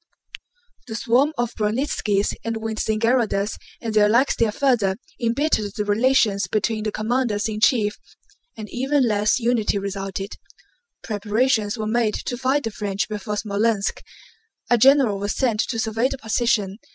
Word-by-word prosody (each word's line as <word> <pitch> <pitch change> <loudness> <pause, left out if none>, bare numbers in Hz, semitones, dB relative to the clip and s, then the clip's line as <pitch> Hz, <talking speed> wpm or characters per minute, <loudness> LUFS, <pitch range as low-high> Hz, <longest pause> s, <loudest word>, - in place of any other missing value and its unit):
The 220 - -5
swarm 255 +5 +2
of 240 -1 -1
Bronnítskis 210 -2 0
and 230 0 -2
Wintzingerodes 220 -1 0 0.2
and 225 -1 -3
their 210 -1 +4
like 240 +5 +3
still 230 - +1
further 215 -5 +1 0.2
embittered 230 -4 0
the 210 -2 -2
relations 210 -1 +2
between 215 0 -1
the 215 - -1
commanders 220 -1 -1
in 215 -1 -4
chief, 215 -1 +2 0.6
and 215 -1 -7
even 265 +1 +1
less 210 +2 +2
unity 230 -3 +1
resulted. 195 0 -5 0.6
Preparations 215 +1 0
were 215 - -3
made 220 0 +1
to 245 - -4
fight 265 +3 0
the 225 - -3
French 205 0 -2
before 210 0 -4
Smolénsk. 210 0 0 0.7
A 240 - +6
general 260 -5 +5
was 205 +1 -2
sent 235 -5 0
to 230 - -2
survey 225 +2 0
the 270 - -5
position. 220 -4 0
220 Hz, 145 wpm, -22 LUFS, 210-240 Hz, 0.7 s, A